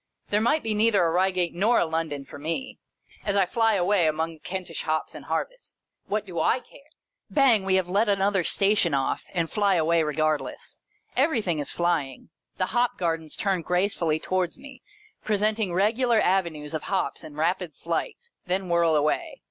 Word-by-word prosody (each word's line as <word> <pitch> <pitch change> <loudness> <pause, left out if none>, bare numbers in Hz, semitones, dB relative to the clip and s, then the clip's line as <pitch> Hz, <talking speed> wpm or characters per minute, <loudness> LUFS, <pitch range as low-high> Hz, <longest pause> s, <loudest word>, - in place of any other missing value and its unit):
There 210 +1 +2
might 300 +7 +2
be 220 -1 0
neither 210 -3 +3
a 165 - +1
Eeigate 180 0 +1
nor 210 +7 +3
a - - +2
London 160 -3 -3
for 145 - -11
me, 165 - -4 0.4
as 200 -1 -1
I 195 -2 +4
flyaway 200 -4 +2
among 160 +2 -1
the 160 - -16
Kentish 180 -1 -5
hops 155 0 -2
and - - -10
harvest. - - -4 0.3
What 210 +1 -1
do 185 - -10
/ - - 0 0.3
care! - - -16 0.5
Bang! 250 -9 +4
We 190 -1 +2
have 190 -2 +1
let 205 +4 +2
another 195 -1 +2
Station 195 -5 +2
off, 135 -1 -1
and 170 -3 -1
fly 200 +1 +2
away 165 0 +3
regardless. 155 0 -2 0.4
Everything 225 - +1
is 145 - -1
flying. 165 -7 -1 0.3
The 185 - -2
hop 245 +1 +1
gardens 165 -3 -2
turn 195 -3 0
gracefully 180 -3 0
towards 185 -1 -1
me, 275 -2 -13 0.4
presenting 215 -1 0
regular 220 +6 +2
avenues 170 -7 0
of 155 - -2
hops - - -1
in 150 - -10
rapid 170 0 -1
flight, 170 - -3 0.3
then 185 0 -1
whirl 170 -2 +3
away. 150 0 0
185 Hz, 170 wpm, -26 LUFS, 165-210 Hz, 0.5 s, I